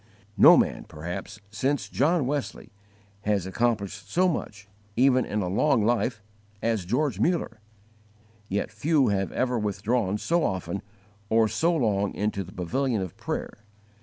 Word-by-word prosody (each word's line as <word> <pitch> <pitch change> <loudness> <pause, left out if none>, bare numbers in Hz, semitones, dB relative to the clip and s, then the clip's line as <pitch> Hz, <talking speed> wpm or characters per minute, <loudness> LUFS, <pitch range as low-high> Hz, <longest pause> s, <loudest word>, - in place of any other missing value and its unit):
No 100 - +8
man, - - 0
perhaps, 90 +7 -7
since 130 -1 -1
John 145 +6 +1
Wesley 145 +1 -3 0.5
has 100 -3 0
accomplished 105 -1 -1
so 185 +2 +3
much 105 - -4 0.3
even 130 0 +4
in 105 -1 -2
a - - -2
long 110 +4 +2
life 115 -1 0 0.4
as 110 -5 -1
George 125 +1 0
Muller; 140 -6 0 0.9
yet 100 +2 -2
few 140 +5 +2
have 95 -1 0
ever 125 -2 0
withdrawn 105 0 0
so 170 +9 +1
often 95 - -2 0.5
or 110 0 +4
so 170 +9 +1
long 100 -8 0
into 105 -1 -1
the 90 - -12
pavilion 115 +7 -1
of 90 - -7
prayer. - - -5
110 Hz, 140 wpm, -26 LUFS, 100-130 Hz, 0.9 s, No